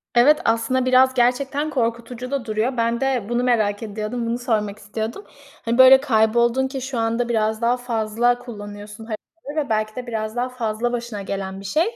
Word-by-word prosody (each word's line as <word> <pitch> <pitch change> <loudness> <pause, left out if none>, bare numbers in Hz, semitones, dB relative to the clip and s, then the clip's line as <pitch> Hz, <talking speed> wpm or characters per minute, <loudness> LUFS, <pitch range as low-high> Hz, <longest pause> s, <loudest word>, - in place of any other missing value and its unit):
Evet, 290 +6 +6
aslında 230 +3 +1
biraz 260 +1 +5
gerçekten 265 +5 +1
korkutucu 240 0 -3
da 275 -4 -2
duruyor. 225 +4 -1
Ben 235 +2 0
de 265 -5 0
bunu 240 +1 0
merak 215 -4 +1
ediyordum. 215 +3 -4
Bunu 230 +1 -1
sormak 215 -4 -1
istiyordum. 220 - -5 0.4
Hani, 230 +1 0
böyle 260 +1 +8
kayboldun 235 +1 +2
ki 265 -1 -5
şu 260 -1 -4
anda 230 +1 0
biraz 220 -1 0
daha 240 +2 +2
fazla 240 0 0
kullanıyorsun 210 -2 -9
haritaları 290 +6 -5
ve - - -15
belki 215 0 -1
de 250 -1 -6
biraz 220 -1 -3
daha 250 +1 -1
fazla 240 -1 -2
başına 235 -4 -4
gelen 195 0 -5
bir 195 - -11
şey. 310 - +2
E, 465 +2 -5
235 Hz, 185 wpm, -22 LUFS, 220-255 Hz, 0.4 s, böyle